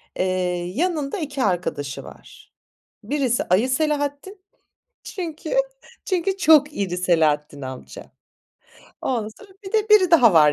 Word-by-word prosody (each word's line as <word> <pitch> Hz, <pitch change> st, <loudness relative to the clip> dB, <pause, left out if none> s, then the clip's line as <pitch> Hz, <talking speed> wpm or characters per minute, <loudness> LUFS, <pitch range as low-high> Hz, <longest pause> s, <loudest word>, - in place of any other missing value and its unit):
Eee, 180 Hz, -1 st, -1 dB
yanında 320 Hz, 0 st, -1 dB
2 290 Hz, -6 st, -3 dB
arkadaşı 165 Hz, -7 st, -2 dB
var. -, -, -15 dB, 0.5 s
Birisi 270 Hz, -5 st, 0 dB
ayı 205 Hz, +8 st, +2 dB
Selahattin, 295 Hz, +6 st, -2 dB, 0.6 s
çünkü 330 Hz, -4 st, -6 dB, 0.5 s
çünkü 375 Hz, +1 st, -1 dB
çok 300 Hz, -5 st, +5 dB
iri 185 Hz, -6 st, -3 dB
Selahattin 155 Hz, -5 st, +1 dB
amca. 130 Hz, -1 st, -9 dB, 0.9 s
Ondan 230 Hz, -5 st, -2 dB
sonra 410 Hz, -, -16 dB
bir 385 Hz, -, -8 dB
de 435 Hz, -1 st, +1 dB
biri 390 Hz, -5 st, +6 dB
daha 250 Hz, -, +6 dB
var 150 Hz, -2 st, +6 dB
265 Hz, 120 wpm, -22 LUFS, -, 0.9 s, biri